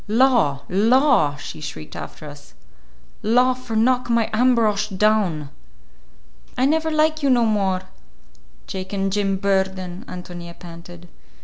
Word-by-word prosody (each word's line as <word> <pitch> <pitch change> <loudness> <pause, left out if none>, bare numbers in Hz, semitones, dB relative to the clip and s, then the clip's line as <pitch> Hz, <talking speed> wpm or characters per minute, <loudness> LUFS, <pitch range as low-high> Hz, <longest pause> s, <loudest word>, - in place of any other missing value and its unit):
"Law, 220 - +3
law!" 220 - +3
she 145 +1 -9
shrieked 80 - -8
after 155 - -8
us. 145 0 -13 0.7
"Law 250 +4 +3
for 250 -3 -7
knock 245 +2 +2
my 230 -1 +1
Ambrosch 220 -3 +2
down!" 190 -7 +1 1.1
"I 255 - +2
never 320 +3 +1
like 310 0 +1
you 280 - +2
no 240 -2 +4
more, 195 -4 0 0.8
Jake 190 +1 -6
and 195 -1 -1
Jim 195 -2 0
Burden," 190 -1 -1
Ántonia 175 -1 -9
panted. 175 0 -12
205 Hz, 125 wpm, -21 LUFS, 175-245 Hz, 1.1 s, no